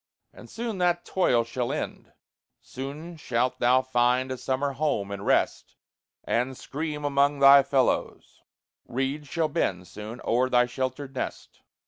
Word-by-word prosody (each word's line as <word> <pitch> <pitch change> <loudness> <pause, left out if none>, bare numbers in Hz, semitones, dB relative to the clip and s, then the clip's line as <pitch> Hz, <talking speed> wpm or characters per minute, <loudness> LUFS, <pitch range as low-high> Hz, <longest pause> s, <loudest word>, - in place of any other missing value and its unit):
And - - -13
soon 230 -4 -4
that 175 -1 +1
toil 125 -11 +2
shall 120 +1 -3
end; - - -5 0.5
Soon 150 +6 -8
shalt 125 -3 -1
thou 125 +2 +4
find 125 +1 +1
a 130 - -3
summer 135 +3 -1
home, 135 -9 -1
and 100 0 -5
rest, - - 0 0.5
And 125 +2 -1
scream 150 0 -5
among 140 0 +2
thy 140 0 +8
fellows; 135 -1 -1 0.5
reeds 135 +4 -2
shall 160 +3 0
bend, 90 -11 -1
Soon, 110 +3 -8
o'er 125 +2 +2
thy 125 -1 +4
sheltered 130 +2 -4
nest. 130 - -6
130 Hz, 140 wpm, -26 LUFS, 125-145 Hz, 0.5 s, thy